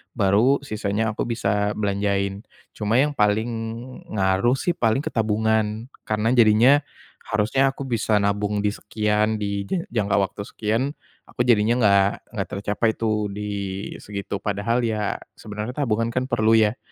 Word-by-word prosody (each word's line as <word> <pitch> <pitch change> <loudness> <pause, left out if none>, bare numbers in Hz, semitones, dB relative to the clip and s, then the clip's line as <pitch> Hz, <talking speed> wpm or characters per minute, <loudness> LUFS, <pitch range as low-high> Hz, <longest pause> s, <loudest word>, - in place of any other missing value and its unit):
baru 115 +7 +3
sisanya 110 -2 -1
aku 110 - -3
bisa 105 -2 0
belanjain. 100 -1 -1 0.3
Cuma 105 +1 -1
yang 145 +4 +3
paling 110 -3 +1 0.6
ngaruh 95 +4 +2
sih 155 +6 0
paling 135 -6 +1
ke - - -4
tabungan 110 +1 0 0.2
karena 110 +1 +1
jadinya 120 +3 +6 0.5
harusnya 125 +6 +1
aku - - -10
bisa 110 -4 +1
nabung 105 +1 0
di 105 - +1
sekian, 105 +1 -1
di 100 -1 -2
je 175 - -1
jangka 105 -4 -1 0.2
waktu - - -8
sekian, 115 +8 -1 0.3
aku - - -4
jadinya 115 -2 +4
enggak 100 -2 +5 0.2
enggak - - -4
tercapai 105 +3 0
tuh 110 -2 -1
di 105 - -6 0.6
segitu. 100 0 -5
Padahal 105 +4 -1
ya 110 -2 -1 0.2
sebenarnya 105 +3 -6
tabungan 115 -4 -1
kan 130 +2 -1
perlu 110 -3 +3
ya 110 +1 +3
110 Hz, 145 wpm, -23 LUFS, 105-115 Hz, 0.6 s, jadinya